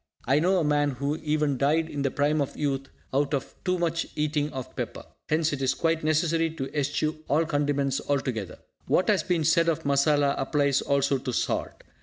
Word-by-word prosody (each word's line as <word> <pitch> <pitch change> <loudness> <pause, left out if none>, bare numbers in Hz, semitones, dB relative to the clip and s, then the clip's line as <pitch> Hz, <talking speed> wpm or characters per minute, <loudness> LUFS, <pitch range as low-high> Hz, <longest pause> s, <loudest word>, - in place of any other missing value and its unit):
I 135 +4 +3
know 185 +4 +3
a 175 - +2
man 145 -1 +2
who 140 +3 -1
even 150 -3 0
died 155 +3 +2
in 145 -3 -4
the 135 - +1
prime 145 +2 +1
of 140 - -3
youth 135 -2 -2 0.2
out 140 +2 +1
of 135 - -5
too 180 -1 +1
much 165 -1 -1
eating 150 0 0
of 130 -1 -7
pepper. - - -5 0.2
Hence 155 0 +1
it 140 - -3
is 130 - +1
quite 165 -1 0
necessary 165 +1 +2
to 135 -1 -5
eschew 150 +2 -1
all 155 +4 +2
condiments 145 -3 0
altogether. 130 -8 -2 0.3
What 185 - +2
has 205 -3 +4
been 175 -3 0
said 165 +2 +3
of 160 - -1
masala 140 0 +3
applies 140 0 +1
also 140 -1 +1
to 125 - -4
salt. - - -2
145 Hz, 195 wpm, -26 LUFS, 140-160 Hz, 0.3 s, has